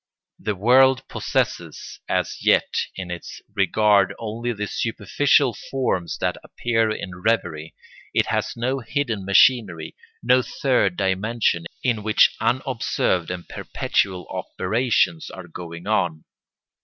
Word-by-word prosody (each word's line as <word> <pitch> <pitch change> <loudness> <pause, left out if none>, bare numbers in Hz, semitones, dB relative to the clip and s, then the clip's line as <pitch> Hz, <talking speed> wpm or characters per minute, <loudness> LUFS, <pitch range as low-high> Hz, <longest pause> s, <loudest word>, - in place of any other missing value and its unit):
The 105 - -2
world 130 +5 +4
possesses - - -3
as - - -1
yet - - +4 0.3
in 90 -2 -6
its 85 - -7
regard 100 0 +3
only 115 +2 -3
the 105 -2 -3
superficial 120 +4 +1
forms 95 - -1
that - - -1
appear 115 -2 0
in 95 -4 -5
revery, 85 -8 -1 0.4
it - - +2
has - - -2
no 130 +3 -1
hidden 120 -3 -2
machinery, 100 -5 +3 0.3
no 125 +1 +4
third 125 -8 0
dimension 95 -2 0 0.2
in 120 -4 +1
which 110 0 +4
unobserved 120 -8 0
and 90 -2 -6
perpetual 90 -3 -1
operations 125 - 0
are 95 -2 -10
going 85 +1 -9
on. 90 -7 0
110 Hz, 120 wpm, -23 LUFS, 90-120 Hz, 0.4 s, world